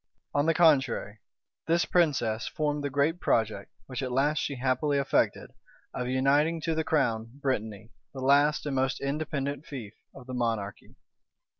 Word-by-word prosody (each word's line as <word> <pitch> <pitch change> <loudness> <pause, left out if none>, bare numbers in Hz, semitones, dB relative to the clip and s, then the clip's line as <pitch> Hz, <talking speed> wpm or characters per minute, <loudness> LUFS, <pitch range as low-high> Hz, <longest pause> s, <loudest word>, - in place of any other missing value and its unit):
On 145 +2 +1
the 165 - +3
contrary, 135 - +3 0.5
this 170 +1 +2
princess 130 -11 +1
formed 150 -1 -2
the 145 - -1
great 145 +5 +1
project, 110 - 0 0.2
which 130 0 -5
at 130 -1 -3
last 145 +4 +2
she 140 - -2
happily 135 +3 0
effected, 140 - 0 0.4
of 125 - -3
uniting 140 +6 +2
to 165 - -1
the 160 0 0
crown 115 -6 0
Brittany, 110 -5 -3 0.2
the 135 - -8
last 145 +3 +3
and 145 -2 -2
most 130 -1 0
independent 140 0 -3
fief 115 -7 -7 0.2
of 130 - -11
the 130 - -7
monarchy. 115 -5 -3
135 Hz, 155 wpm, -28 LUFS, 120-150 Hz, 0.5 s, the